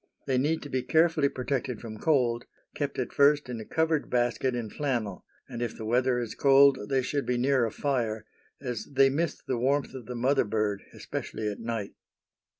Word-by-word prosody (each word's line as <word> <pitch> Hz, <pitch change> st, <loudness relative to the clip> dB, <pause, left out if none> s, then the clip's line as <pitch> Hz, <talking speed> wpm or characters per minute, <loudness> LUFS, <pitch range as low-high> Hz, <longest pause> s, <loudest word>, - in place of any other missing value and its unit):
They 130 Hz, -2 st, +1 dB
need 155 Hz, +4 st, 0 dB
to 145 Hz, -, -8 dB
be 130 Hz, -1 st, 0 dB
carefully 160 Hz, -1 st, +3 dB
protected 125 Hz, -2 st, -3 dB
from 110 Hz, -2 st, -8 dB
cold, 125 Hz, -6 st, +1 dB, 0.3 s
kept 145 Hz, -1 st, -3 dB
at 125 Hz, -, -3 dB
first 145 Hz, -1 st, +4 dB
in 120 Hz, -2 st, -4 dB
a -, -, -8 dB
covered 160 Hz, -2 st, 0 dB
basket 120 Hz, +1 st, +1 dB
in 115 Hz, -3 st, -4 dB
flannel, 120 Hz, -10 st, -2 dB, 0.2 s
and 120 Hz, -, -6 dB
if 120 Hz, -2 st, -3 dB
the 110 Hz, -, -6 dB
weather 125 Hz, +2 st, +2 dB
is 120 Hz, -3 st, -3 dB
cold 135 Hz, -5 st, +5 dB
they 135 Hz, -1 st, +2 dB
should 140 Hz, +2 st, -2 dB
be 125 Hz, -, +1 dB
near 130 Hz, 0 st, +3 dB
a -, -, -5 dB
fire, 115 Hz, -6 st, -1 dB, 0.3 s
as 125 Hz, -5 st, -4 dB
they 135 Hz, 0 st, +5 dB
miss 165 Hz, +4 st, -1 dB
the 125 Hz, -3 st, -2 dB
warmth 140 Hz, +3 st, +1 dB
of 125 Hz, -4 st, -9 dB
the 125 Hz, -, -5 dB
mother 135 Hz, +4 st, +2 dB
bird, 105 Hz, -1 st, -1 dB
especially 110 Hz, -, -5 dB
at 100 Hz, -, -8 dB
night. 115 Hz, -3 st, -4 dB
125 Hz, 195 wpm, -28 LUFS, 115-140 Hz, 0.3 s, cold